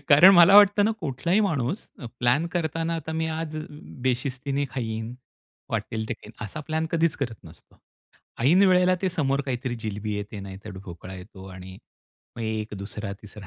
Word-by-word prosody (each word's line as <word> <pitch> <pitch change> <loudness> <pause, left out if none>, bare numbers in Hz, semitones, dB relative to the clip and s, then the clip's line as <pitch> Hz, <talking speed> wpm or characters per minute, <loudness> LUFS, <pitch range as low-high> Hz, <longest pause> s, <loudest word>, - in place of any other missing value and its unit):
कारण 185 +6 +9
मला 175 +3 +8
वाटतं 205 0 +7
ना, - - +2
कुठलाही 165 +7 0
माणूस 150 - -2
अ, 125 - -7
प्लॅन 125 +7 +2
करतांना, 165 0 -1
आता 160 0 -5
मी 160 - 0
आज 155 -1 -4 0.5
बेशिस्तीने 135 +2 -1
खाईन, 115 -2 -4 0.6
वाटेल 110 -1 -2
ते - - 0
खाईन, 105 0 -14
असा 130 +9 -7
प्लॅन 160 +1 0
कधीच 165 -1 +2
करत 115 -4 -6
नसतो. - - -17 0.6
ऐन 170 +10 +5
वेळेला 180 0 +4
ते 190 - +2
समोर 140 -5 0
काहीतरी 125 -1 -2
जिलेबी 105 0 -3
येते, 105 0 -6
नाहीतर 100 +2 -9
ढोकळा 90 +2 -9
येतो 95 +1 -11
आणि 95 0 -10 0.6
मग 115 - -5
एक 110 -1 -3
2रा-3रा, 100 0 -7
130 Hz, 160 wpm, -25 LUFS, 105-165 Hz, 0.6 s, कारण